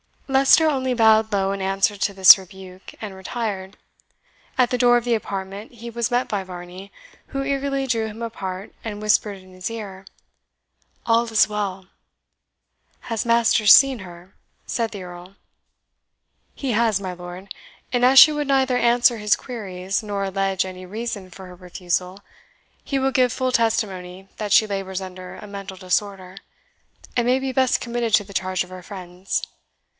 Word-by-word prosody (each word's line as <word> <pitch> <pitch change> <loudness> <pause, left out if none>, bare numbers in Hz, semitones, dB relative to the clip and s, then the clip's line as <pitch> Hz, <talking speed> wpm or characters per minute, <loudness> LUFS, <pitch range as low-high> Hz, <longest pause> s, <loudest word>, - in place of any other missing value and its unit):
Leicester 270 +4 +5
only 260 -4 0
bowed 220 -1 +4
low 195 -1 +1
in 195 0 -4
answer 195 +2 0
to 200 +1 -1
this 190 0 +9
rebuke, 190 -1 -12
and 210 -3 -6
retired. 190 0 -5 0.8
At 250 -2 +3
the 250 - 0
door 245 0 +5
of 240 - +1
the 240 -1 0
apartment 200 0 -5
he 235 0 -9
was 235 0 -2
met 245 0 0
by 200 -2 -2
Varney, 180 +1 -10 0.4
who 275 -1 -3
eagerly 275 0 -1
drew 230 -4 -1
him 220 +1 -9
apart, 195 -4 -6
and 210 -2 -6
whispered 210 -1 +1
in 185 0 -17
his 185 +2 -5
ear, 200 -4 -8 1.0
"All 230 0 +3
is 220 -2 +3
well!" 195 -3 -4 1.2
"Has 225 0 -1
Masters 230 -2 +5
seen 270 -3 +5
her?" 180 0 -12 0.3
said 230 -2 -2
the 200 -3 -7
Earl. 180 +2 -11 1.2
"He 270 -3 -3
has, 225 -2 +2
my 185 -2 -4
lord; 180 +2 -9 0.4
and 245 -1 +2
as 265 +2 +5
she 310 - +10
would 295 -1 -2
neither 265 -2 +2
answer 240 0 +3
his 210 -1 +2
queries, 195 -4 -4
nor 205 -2 -3
allege 195 0 -1
any 185 0 -8
reason 205 -1 -5
for 190 +2 -12
her 180 - -12
refusal, 180 +1 -4 0.6
he 275 - -2
will 270 0 +1
give 250 -1 +2
full 255 0 -1
testimony 195 -6 -1
that 210 -2 -2
she 220 - +6
labours 195 -2 -4
under 185 -1 -9
a - - -10
mental 200 -1 -8
disorder, 190 0 -3 0.8
and 240 -1 +2
may 250 +1 +3
be 265 0 -3
best 260 0 +1
committed 235 -2 -3
to 205 - +1
the 200 0 -13
charge 185 0 -1
of 180 - -15
her 185 0 -9
friends. 180 0 -5
205 Hz, 170 wpm, -22 LUFS, 190-235 Hz, 1.2 s, she